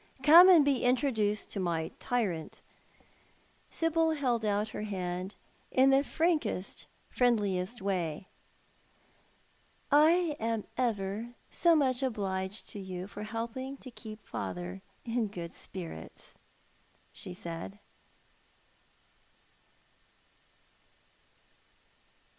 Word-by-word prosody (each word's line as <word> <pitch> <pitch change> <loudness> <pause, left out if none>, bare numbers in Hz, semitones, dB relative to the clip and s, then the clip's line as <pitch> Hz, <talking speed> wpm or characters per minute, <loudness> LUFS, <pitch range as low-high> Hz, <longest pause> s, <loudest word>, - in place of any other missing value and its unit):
Come 340 +5 +10
and 335 -6 +8
be 275 -3 +2
introduced 235 -5 +1
to 200 - -3
my 170 -3 -1
tyrant." 195 -10 -2 1.1
Sibyl 325 0 +2
held 250 -6 0
out 210 0 +1
her - - -6
hand 185 -3 -3
to - - -20 0.4
him 260 - +7
in 270 - +7
the 270 +1 +5
frankest, 310 - -1 0.2
friendliest 210 -4 +1
way. 180 -3 -2 0.8
" - - -35
I 315 +2 +5
am 225 -1 -1
ever 225 0 -2 0.2
so 340 -1 +4
much 265 -4 +2
obliged 195 -5 -2
to 205 - -7
you 185 -1 -5
for 205 +1 -9
helping 235 +5 -4
to 255 - -10
keep 215 -1 -10
father 180 +2 -5 0.2
in 230 -1 0
good 175 -4 -7
spirits," 165 - -9 0.8
she 180 - -6
said. 170 +3 -6
220 Hz, 100 wpm, -31 LUFS, 190-260 Hz, 1.1 s, Come